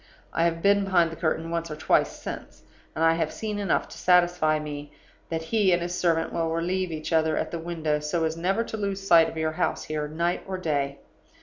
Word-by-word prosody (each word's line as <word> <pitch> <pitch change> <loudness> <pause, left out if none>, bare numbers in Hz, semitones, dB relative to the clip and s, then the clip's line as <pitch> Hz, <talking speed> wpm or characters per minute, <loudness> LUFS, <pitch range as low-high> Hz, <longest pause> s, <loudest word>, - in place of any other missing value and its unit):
I 165 - +2
have 165 0 -1
been 200 0 +4
behind 175 -4 +3
the - - -6
curtain 165 0 -1
once 170 0 -2
or 155 - -5
twice - - +2
since; - - -8 0.3
and 160 - 0
I 165 - +5
have 165 -2 -1
seen 210 -2 -4
enough 200 - 0
to - - -10
satisfy 175 -3 +3
me 145 -1 -6 0.4
that 160 -1 -2
he 200 +2 +2
and 175 0 +1
his 175 0 -3
servant 165 -2 +1
will 165 -1 0
relieve 175 +2 -1
each 155 +1 -4
other 160 -1 +2
at - - -2
the 170 - -3
window, 160 -3 -1
so 150 +3 -1
as 160 0 0
never 190 +7 0
to 220 - -6
lose 200 -2 -3
sight 170 -3 +6
of - - -9
your 160 0 0
house 155 - -1
here, 150 -1 -3
night 170 +3 -1
or 190 -1 -3
day. 140 -5 -1
165 Hz, 225 wpm, -26 LUFS, 160-180 Hz, 0.4 s, sight